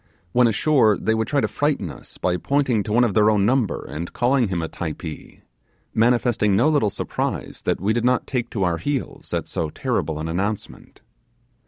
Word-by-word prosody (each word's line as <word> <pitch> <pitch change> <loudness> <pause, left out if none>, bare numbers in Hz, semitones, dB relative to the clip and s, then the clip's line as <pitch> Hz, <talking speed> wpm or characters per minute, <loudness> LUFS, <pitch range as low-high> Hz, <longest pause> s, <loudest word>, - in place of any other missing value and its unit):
When 125 +3 +4
ashore 115 -2 +3
they 110 - 0
would 110 -1 0
try 140 +1 +1
to - - +1
frighten 145 - -1
us - - -12
by 90 -1 0
pointing, 135 -2 +1
to 105 - -4
one 120 +3 +4
of 115 -5 +1
their 105 +1 +4
own 105 -2 +3
number, 120 -4 +1
and 85 +3 -5
calling 125 -1 +2
him 90 -3 -2
a 80 - -2
Typee, 80 -1 -7 0.5
manifesting 115 -3 +2
no 120 +10 +4
little 145 -9 +2
surprise - - -4
that - - +1
we 105 +4 +1
did 120 0 0
not 125 0 +2
take 125 -3 -2
to 100 -5 -2
our 85 -2 +1
heels 145 -3 -4
at - - -1
so 80 - -2
terrible 75 0 -2
an 80 +1 -4
announcement. 100 +5 -4
110 Hz, 195 wpm, -22 LUFS, 95-125 Hz, 0.5 s, When